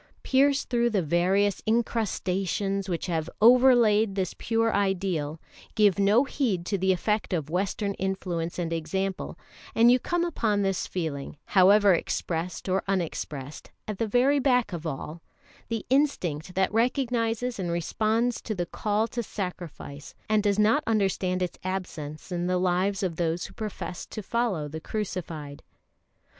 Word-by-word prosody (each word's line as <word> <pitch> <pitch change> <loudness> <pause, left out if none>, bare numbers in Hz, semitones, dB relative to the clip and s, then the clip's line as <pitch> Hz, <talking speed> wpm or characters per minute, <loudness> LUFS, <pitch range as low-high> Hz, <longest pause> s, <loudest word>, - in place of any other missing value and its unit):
Pierce 275 +1 +3
through 240 -1 +1
the 200 -5 0
various 185 +5 +2
incrustations 200 -3 0
which 170 -2 -2
have 165 -3 -2
over 250 +3 +7
laid 215 -3 +3
this 190 -2 -1
pure 225 0 0
ideal, 185 -6 0 0.4
give 205 -4 +4
no 205 +6 +5
heed 230 - -1
to 200 - -1
the 190 0 +2
effect 210 +3 0
of 155 -3 -2
Western 200 +3 -1
influence 185 -3 -3
and 170 -2 -2
example, 190 +4 -3 0.4
and 235 +2 +6
you 250 - +5
come 345 +6 0
upon 215 -11 0
this 195 -2 -1
feeling, 155 -5 -4
however 200 +1 +6
expressed 170 +1 -2
or 190 +1 +1
unexpressed, 155 -6 -3 0.2
at 210 -3 -5
the 225 - 0
very 255 +6 +3
back 250 -6 +2
of 165 -1 -4
all 155 +3 -6 0.5
the 225 -2 -3
instinct 180 - 0
that 190 +1 +1
recognises 240 -1 0
and 180 -2 -2
responds 220 +8 0
to 215 - -4
the 175 -2 -1
call 210 +5 -1
to 235 - -3
sacrifice, 175 -9 -7
and 215 -1 +3
does 205 -1 +1
not 220 +8 +3
understand 190 -4 +1
its 180 - -4
absence 180 -4 -5
in 175 0 -1
the 180 0 +1
lives 185 +2 +1
of 170 -4 -2
those 170 0 -1
who - - -10
profess 210 -4 -6
to 215 - -7
follow 205 -9 -1
the 160 +2 -7
Crucified. 165 -9 -5
195 Hz, 150 wpm, -27 LUFS, 175-225 Hz, 0.5 s, over